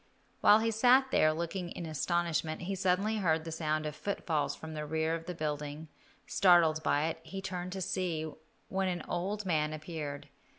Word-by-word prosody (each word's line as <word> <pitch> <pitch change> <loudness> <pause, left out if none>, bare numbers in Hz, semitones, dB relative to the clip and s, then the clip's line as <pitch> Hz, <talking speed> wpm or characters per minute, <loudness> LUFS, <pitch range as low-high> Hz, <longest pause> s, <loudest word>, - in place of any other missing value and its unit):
While 210 - +7
he 225 0 +1
sat 255 +4 +5
there, 155 - +4
looking 170 +3 -3
in 170 - -6
astonishment, 160 +1 -1
he 195 +3 -2
suddenly 195 +3 +1
heard 160 -5 +1
the 165 - -6
sound 155 -1 -1
of 150 -1 -4
footfalls 155 -8 -1
from 160 0 -8
the 150 -1 -4
rear 160 +1 0
of 165 0 -4
the 180 - -4
building. 150 0 -4 0.4
Startled 175 -9 +4
by 145 0 +2
it, 160 0 -2
he 195 +3 -7
turned 185 -2 -4
to 190 - -4
see, 170 -4 -1 0.4
when 190 0 0
an 175 -3 -2
old 200 +4 -2
man 155 -4 +1
appeared. 155 -3 -6
165 Hz, 180 wpm, -32 LUFS, 155-190 Hz, 0.4 s, While